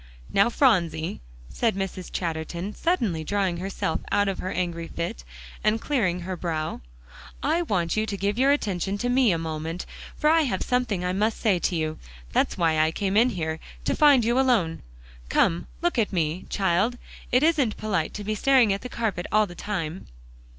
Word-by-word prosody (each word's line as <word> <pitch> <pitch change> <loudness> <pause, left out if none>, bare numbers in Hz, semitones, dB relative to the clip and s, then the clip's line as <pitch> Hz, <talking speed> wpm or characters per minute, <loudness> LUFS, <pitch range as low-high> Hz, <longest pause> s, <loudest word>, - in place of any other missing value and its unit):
"Now, 200 +4 +5
Phronsie," 175 - +1 0.3
said 225 - 0
Mrs. 190 -2 -4
Chatterton, 170 +3 -3
suddenly 220 - 0
drawing 190 -1 0
herself 185 -3 -2
out 205 0 +3
of 195 - -2
her 185 - -3
angry 170 -3 -2
fit, 170 - -4 0.4
and 215 +1 +2
clearing 195 -11 0
her 185 +1 -4
brow, 160 -3 -3 0.6
"I 315 +5 +2
want 180 - 0
you 215 0 0
to 200 - -3
give 200 +3 -1
your 270 +2 +5
attention 200 - -1
to 245 +4 -1
me 250 -3 +4
a 170 - +1
moment, 160 +1 -4 0.3
for 300 - +1
I 325 0 +5
have 240 -11 -1
something 240 -8 0
I 180 - 0
must 215 +3 0
say 200 -6 +2
to 175 - 0
you. 155 -1 -2 0.3
That's - - +1
why 160 -2 +2
I 155 0 +4
came 195 +3 -1
in 235 +4 +5
here, 160 -6 -3 0.3
to - - +1
find 280 -6 +6
you 240 +3 +2
alone. 225 -12 +2 0.5
Come, 170 +1 +2 0.2
look 345 -7 +1
at 215 - +1
me, 170 -1 -1
child. 195 +5 +1 0.3
It 250 +3 +4
isn't 300 -9 +2
polite 190 -7 -1
to 210 - -5
be 215 +2 -1
staring 240 -1 +4
at 195 - -4
the 250 - -7
carpet 215 -7 -2
all 215 0 +4
the 175 - -10
time." 175 -3 -4
195 Hz, 185 wpm, -25 LUFS, 170-230 Hz, 0.6 s, find